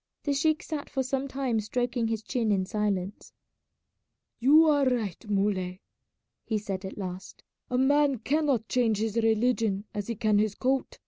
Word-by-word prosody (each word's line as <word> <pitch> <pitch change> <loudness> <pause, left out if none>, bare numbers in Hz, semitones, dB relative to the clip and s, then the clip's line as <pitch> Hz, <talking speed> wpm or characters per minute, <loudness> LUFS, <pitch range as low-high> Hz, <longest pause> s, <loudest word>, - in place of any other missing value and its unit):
The 285 - 0
sheik 310 +2 +1
sat 300 -2 -5
for 265 - -1
some 270 +1 -2
time 265 -4 -1
stroking 240 +2 -1
his 225 -1 -2
chin 230 -4 -1
in 190 -2 +1
silence. 205 -2 -2 1.1
"You 295 +7 +6
are 290 -2 +3
right, 215 -4 -3
Muley," 195 -2 -1 0.6
he 220 - -1
said 195 -2 -4
at 190 - -7
last; 185 -2 -7 0.3
"a 250 - 0
man 285 +1 +3
cannot 270 -2 0
change 230 -4 +1
his 220 0 -2
religion 225 -2 +1
as 205 -1 -4
he 230 - -3
can 215 -2 +2
his 210 -1 0
coat. 265 +1 -1
225 Hz, 165 wpm, -28 LUFS, 205-265 Hz, 1.1 s, You